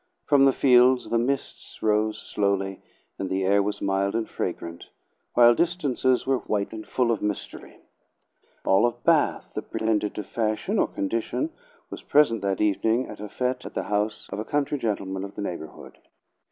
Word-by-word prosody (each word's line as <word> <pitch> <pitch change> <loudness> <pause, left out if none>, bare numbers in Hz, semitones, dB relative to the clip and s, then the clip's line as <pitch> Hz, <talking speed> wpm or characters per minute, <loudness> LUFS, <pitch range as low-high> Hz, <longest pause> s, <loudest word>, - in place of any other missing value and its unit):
From 140 -2 +5
the 135 - +6
fields 125 -1 +4
the 115 - +2
mists 135 +3 -3
rose 110 0 +2
slowly, 100 -1 -1 0.4
and 95 - -3
the 95 0 0
air 100 +1 +4
was 105 +1 -3
mild 100 +1 0
and 115 -1 -1
fragrant, 85 -1 -5 0.5
while 120 0 +7
distances 140 -5 +1
were 135 -1 +1
white 105 0 -2
and 110 -1 -8
full 125 -2 +1
of 110 - -1
mystery. 105 -1 -5 0.9
All 95 +5 +4
of 120 0 -6
Bath 165 -3 +2
that - - -6
pretended 110 -2 0
to 105 - -4
fashion 110 +2 -1
or - - +3
condition 115 - -2 0.4
was - - -7
present 130 -8 +3
that 100 -1 -1
evening 110 +4 +1
at - - -9
a 105 0 -6
fete 125 +2 -2
at - - -9
the - - -1
house 105 +1 -1
of 100 - -4
a - - -2
country 145 +2 -1
gentleman 95 -4 -2
of 100 0 -8
the 105 - -4
neighborhood. 85 -5 -7
110 Hz, 175 wpm, -25 LUFS, 100-125 Hz, 0.9 s, while